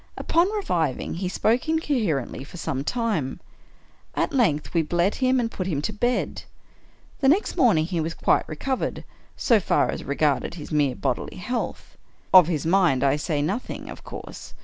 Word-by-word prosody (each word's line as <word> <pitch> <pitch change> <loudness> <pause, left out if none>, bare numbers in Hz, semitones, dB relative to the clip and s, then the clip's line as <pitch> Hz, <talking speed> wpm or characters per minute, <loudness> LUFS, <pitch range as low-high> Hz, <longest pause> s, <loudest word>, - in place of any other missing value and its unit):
Upon 345 +4 +2
reviving 175 - -1
he 180 +2 -3
spoke 235 - +1
incoherently 225 - 0
for 155 - -11
some 140 -5 -3
time. 210 - -1 0.8
At - - 0
length 185 - +1
we 165 - +3
bled 175 +5 +1
him 255 0 +3
and 230 -2 -1
put 185 - -4
him 155 -7 -1
to 215 - -2
bed. 240 +4 -1 0.8
The 270 - +2
next 365 +9 +2
morning 195 - +4
he 170 -1 -2
was 165 +1 -3
quite - - +1
recovered, 255 - -3 0.3
so 230 -4 +4
far - - +1
as - - -5
re 140 - -3
garded 150 +2 +1
his 155 -2 -9
mere 145 -4 +2
bodily - - -3
health. - - -4 0.3
Of 185 -4 +9
his 160 -4 -1
mind 165 -7 +3
I 140 0 +3
say 150 0 -1
nothing, 195 +11 -4
of - - -10
course. - - -9
175 Hz, 170 wpm, -24 LUFS, 150-240 Hz, 0.8 s, Of